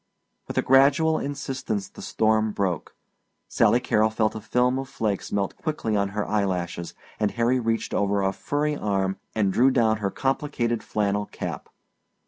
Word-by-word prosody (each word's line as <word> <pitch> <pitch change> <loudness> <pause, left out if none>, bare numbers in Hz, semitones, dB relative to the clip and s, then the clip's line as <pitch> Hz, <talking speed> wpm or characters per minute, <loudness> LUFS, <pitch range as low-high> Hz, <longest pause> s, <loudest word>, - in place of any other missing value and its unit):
With - - -6
a - - +3
gradual 140 +4 +4
insistence 135 -7 -3
the - - -13
storm 110 -1 +1
broke. 95 -6 -2 0.5
Sally 120 - +3
Carrol 110 -3 +2
felt 110 0 0
a 110 - -6
film 125 +4 +1
of 135 0 -6
flakes 105 -3 -2
melt 100 -1 -1
quickly 150 -9 -2
on 100 -1 +1
her 105 - -1
eyelashes, 90 -4 -2 0.2
and 105 -1 +2
Harry 120 +4 +1
reached 115 -1 -1
over 100 0 +1
a 95 0 +1
furry 150 +7 -1
arm 95 -5 -1 0.2
and 100 -3 +1
drew 130 +6 +5
down 115 -4 +2
her 100 -2 -1
complicated 130 -2 -1
flannel 105 -1 -1
cap. - - -6
110 Hz, 160 wpm, -25 LUFS, 100-130 Hz, 0.5 s, drew